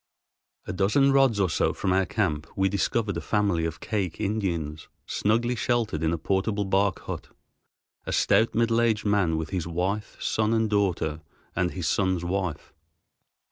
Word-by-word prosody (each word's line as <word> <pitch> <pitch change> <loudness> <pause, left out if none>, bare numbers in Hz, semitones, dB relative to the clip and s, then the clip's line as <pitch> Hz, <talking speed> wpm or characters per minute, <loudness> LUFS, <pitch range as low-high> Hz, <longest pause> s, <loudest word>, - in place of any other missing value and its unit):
A - - -4
dozen 105 +9 +3
rods 135 -6 +4
or 95 - +3
so 85 - +1
from 95 -2 0
our 95 0 +2
camp 80 -8 -1
we 95 0 +2
discovered 100 +2 0
a - - -3
family 100 -6 +1
of 80 -1 -4
Kake 100 -6 -3
Indians 85 -8 -2 0.2
snugly 115 +4 +1
sheltered 115 -8 0
in 80 0 +1
a 85 - 0
portable 100 +5 0
bark 95 +1 +1
hut, - - -6 0.8
a - - -2
stout 115 - +3
middle 115 0 +3
aged 110 -2 +1
man 100 -6 +2
with 80 -1 -4
his 90 -4 -2
wife, 95 +5 -2
son, 110 +1 +1
and 110 -1 +1
daughter, 90 -6 0 0.3
and 90 -1 +1
his 90 -2 -5
son's 95 -3 +1
wife. 95 -2 -3
100 Hz, 165 wpm, -26 LUFS, 85-110 Hz, 0.8 s, rods